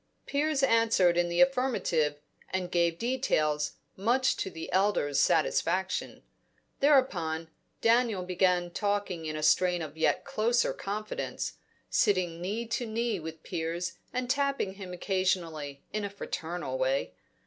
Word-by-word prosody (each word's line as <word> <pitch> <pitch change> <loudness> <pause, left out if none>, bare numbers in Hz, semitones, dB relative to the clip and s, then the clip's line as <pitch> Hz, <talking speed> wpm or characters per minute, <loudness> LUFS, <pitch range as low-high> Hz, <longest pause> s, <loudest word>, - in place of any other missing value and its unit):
Piers 285 0 0
answered 225 -8 +4
in 175 0 +2
the 170 - +2
affirmative, 250 - +2 0.3
and 185 -1 -2
gave 170 -1 +2
details, 155 - 0 0.2
much 240 +7 +2
to - - -2
the 160 -3 -7
elder's 185 -8 +2
satisfaction. 185 +6 +1 0.6
Thereupon, 175 - +2 0.3
Daniel 230 -4 +3
began 180 -1 +1
talking 200 -4 -1
in 155 - -3
a 155 - -4
strain 180 +3 +4
of 150 -1 -8
yet 160 - +1
closer 235 +3 +1
confidence, 210 +2 -4 0.4
sitting 180 -6 +2
knee 210 +6 -2
to 235 +1 -2
knee 225 -2 -1
with 160 0 -8
Piers 170 +1 -3
and 250 0 -2
tapping 275 -6 0
him 190 -2 -8
occasionally 175 -6 -1
in 210 0 -1
a 200 - -2
fraternal 180 - -4
way. - - 0
190 Hz, 130 wpm, -29 LUFS, 170-230 Hz, 0.6 s, answered